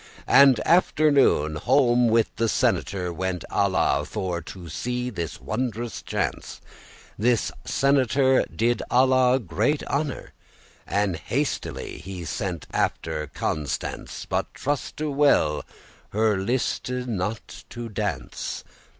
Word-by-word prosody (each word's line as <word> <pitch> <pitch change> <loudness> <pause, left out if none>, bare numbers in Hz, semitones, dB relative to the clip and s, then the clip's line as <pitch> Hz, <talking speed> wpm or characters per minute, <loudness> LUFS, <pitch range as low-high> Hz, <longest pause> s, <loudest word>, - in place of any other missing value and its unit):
And, 135 -3 +6
after 155 -3 +4
noon, 80 - +3
home 125 - +3
with 115 0 +2
the 115 -1 +1
senator. 90 -4 0
Went 95 0 -3
Alla, - - +2
for 90 -2 -3
to 85 +2 -10
see 125 +9 -3
this 85 - -5
wondrous 115 - -3
chance. - - -3 0.6
This 120 +1 +2
senator 135 -1 +3
did 120 +1 0
Alla 130 0 +4
great 110 - 0
honor, 145 -1 -3 0.5
And 100 -4 0
hastily 140 - -3
he 95 -3 -7
sent 90 -2 -3
after 80 -2 -1
Constance: 75 0 -4
But - - -2
truste 145 +1 -3
well, 80 - +3 0.5
her 110 0 +2
liste 120 +7 -1
not 115 -4 -4
to 120 0 -6
dance. 105 -6 -4
115 Hz, 110 wpm, -25 LUFS, 90-130 Hz, 0.6 s, And